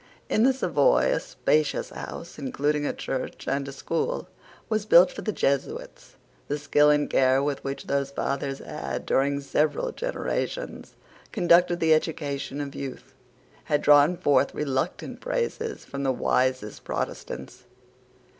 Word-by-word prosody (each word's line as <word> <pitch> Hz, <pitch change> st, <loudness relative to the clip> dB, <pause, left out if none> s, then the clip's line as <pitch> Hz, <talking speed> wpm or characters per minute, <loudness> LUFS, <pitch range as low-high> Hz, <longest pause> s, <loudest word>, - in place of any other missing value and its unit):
In 215 Hz, -, +2 dB
the 260 Hz, +3 st, +6 dB
Savoy -, -, +3 dB
a -, -, +1 dB
spacious 150 Hz, -1 st, 0 dB
house, 170 Hz, -2 st, -8 dB
including 145 Hz, +2 st, -1 dB
a -, -, 0 dB
church 130 Hz, -, -5 dB
and 140 Hz, 0 st, -1 dB
a -, -, -5 dB
school, 160 Hz, +4 st, -2 dB, 0.4 s
was 215 Hz, -1 st, -1 dB
built 180 Hz, -1 st, +7 dB
for -, -, -7 dB
the 215 Hz, -, -1 dB
Jesuits. 140 Hz, -8 st, -2 dB, 0.3 s
The 145 Hz, -, -1 dB
skill 150 Hz, 0 st, +3 dB
and 145 Hz, 0 st, +3 dB
care 130 Hz, +1 st, +3 dB
with 145 Hz, -1 st, -2 dB
which 135 Hz, 0 st, -4 dB
those 140 Hz, 0 st, 0 dB
fathers 140 Hz, 0 st, -2 dB
had, -, -, -5 dB
during 140 Hz, +1 st, +1 dB
several 155 Hz, -, 0 dB
generations, -, -, -4 dB, 0.4 s
conducted 175 Hz, -3 st, +4 dB
the 160 Hz, -2 st, +4 dB
education 145 Hz, -3 st, -2 dB
of 140 Hz, -1 st, -5 dB
youth, 135 Hz, -1 st, -7 dB, 0.5 s
had 150 Hz, -2 st, +1 dB
drawn 145 Hz, +4 st, +6 dB
forth 140 Hz, -3 st, +2 dB
reluctant 135 Hz, -3 st, -2 dB
praises 465 Hz, -2 st, -3 dB
from 140 Hz, -, -6 dB
the 135 Hz, -1 st, +1 dB
wisest 130 Hz, -3 st, 0 dB
Protestants. 125 Hz, -, -5 dB
145 Hz, 140 wpm, -26 LUFS, 140-175 Hz, 0.5 s, built